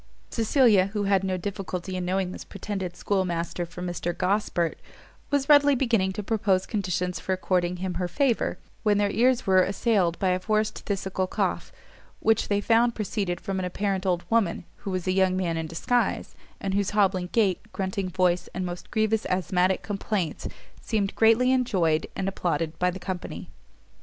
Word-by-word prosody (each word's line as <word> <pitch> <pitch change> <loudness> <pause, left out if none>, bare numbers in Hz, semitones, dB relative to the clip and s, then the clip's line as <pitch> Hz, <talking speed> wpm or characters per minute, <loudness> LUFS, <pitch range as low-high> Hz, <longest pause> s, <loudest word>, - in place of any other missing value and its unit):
Cecilia, 225 -4 +4
who 205 0 -2
had 195 -1 +2
no 190 -1 -1
difficulty 185 -1 -4
in 180 -1 -2
knowing 185 0 0
this - - -7
pretended 195 -3 -5
schoolmaster 175 -3 -1
for 175 +2 -8
Mr 175 -1 -3
Gosport, 180 -4 0 0.5
was 285 -2 +1
readily 290 -1 +6
beginning 230 -7 +1
to 210 - -4
propose 195 -3 +1
conditions 180 -4 -2
for 190 - -2
according 180 -1 0
him 185 0 -3
her 180 - 0
favour, 260 +4 0 0.2
when 210 -2 +3
their 205 -1 +2
ears 245 +3 +2
were 190 -1 +5
assailed 195 -3 +1
by 190 - +1
a 180 0 +1
forced 215 +3 -1
phthisical 190 -2 -2
cough, - - -1 0.5
which 225 0 +2
they 205 0 +1
found 230 +2 +3
proceeded 195 -4 -2
from 195 -1 -3
an 185 - -2
apparent 195 +1 -1
old 175 -2 +1
woman, 215 -7 +1
who - - -7
was 185 -2 -2
a 185 - +1
young 185 0 +2
man 175 -3 -1
in 160 0 -3
disguise, 240 +10 0 0.3
and 195 -1 -2
whose 200 -1 +1
hobbling 190 -3 +2
gait, 200 -6 +2
grunting 190 -1 -2
voice, 180 -1 +1
and 185 0 -2
most 175 0 -6
grievous 220 0 +1
asthmatic 185 0 +1
complaints, 200 -4 -2 0.3
seemed 205 -4 -1
greatly 230 +3 +4
enjoyed 185 -12 +1
and 195 - -2
applauded 170 -4 -1
by 180 - +3
the 180 - -5
company. 185 -1 -6
190 Hz, 170 wpm, -26 LUFS, 180-210 Hz, 0.5 s, readily